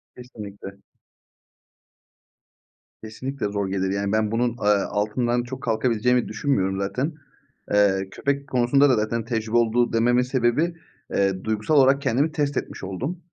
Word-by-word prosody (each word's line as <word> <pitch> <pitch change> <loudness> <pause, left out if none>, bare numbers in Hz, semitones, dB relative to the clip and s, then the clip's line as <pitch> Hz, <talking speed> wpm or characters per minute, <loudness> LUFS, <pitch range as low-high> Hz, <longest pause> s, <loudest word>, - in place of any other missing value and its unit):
Kesinlikle. 105 -5 -10 2.3
Kesinlikle 130 +5 -5
zor 100 -1 -2
gelir. 95 0 -1
Yani 100 0 -1
ben 110 0 +1
bunun, 120 +2 +1
eee, 115 -3 -2 0.2
altından 120 +4 0
çok 130 +1 -8
kalkabileceğimi 120 +1 +1
düşünmüyorum 105 -5 0
zaten. 130 +11 -2 0.6
Eee, 95 -2 +3
köpek 140 0 -2
konusunda 130 +3 +3
da 130 - +4
zaten 110 +1 -1
tecrübe 115 -1 -1
oldu 120 +1 +2
dememin 120 +2 +3
sebebi, 130 +6 +1 0.4
eee, 95 -1 +1
duygusal 110 +7 0
olarak 140 0 +5
kendimi 140 +3 +1
test 145 -3 -1
etmiş - - -5
oldum. 125 - -4
120 Hz, 130 wpm, -24 LUFS, 105-130 Hz, 2.3 s, olarak